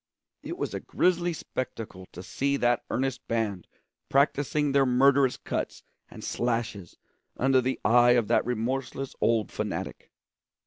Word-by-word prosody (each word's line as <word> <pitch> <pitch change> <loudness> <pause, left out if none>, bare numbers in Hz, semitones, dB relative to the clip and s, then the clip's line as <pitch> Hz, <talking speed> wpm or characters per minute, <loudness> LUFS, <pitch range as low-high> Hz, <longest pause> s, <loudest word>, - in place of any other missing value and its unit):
It - - -6
was - - -3
a - - -2
grisly 175 -1 +1
spectacle 115 - -6
to 90 - -9
see 140 +7 -1
that 120 -2 +2
earnest 135 +1 -2
band 110 -5 -2 0.4
practising 145 +1 +2
their 140 0 +4
murderous 135 +1 +4
cuts - - -4 0.3
and - - -11
slashes 115 -6 -2 0.4
under 130 0 +3
the 130 +1 -2
eye 120 +1 +6
of 120 -3 +2
that 115 - +3
remorseless 130 +3 -3
old 115 -3 +2
fanatic. - - -5
125 Hz, 135 wpm, -27 LUFS, 115-135 Hz, 0.4 s, eye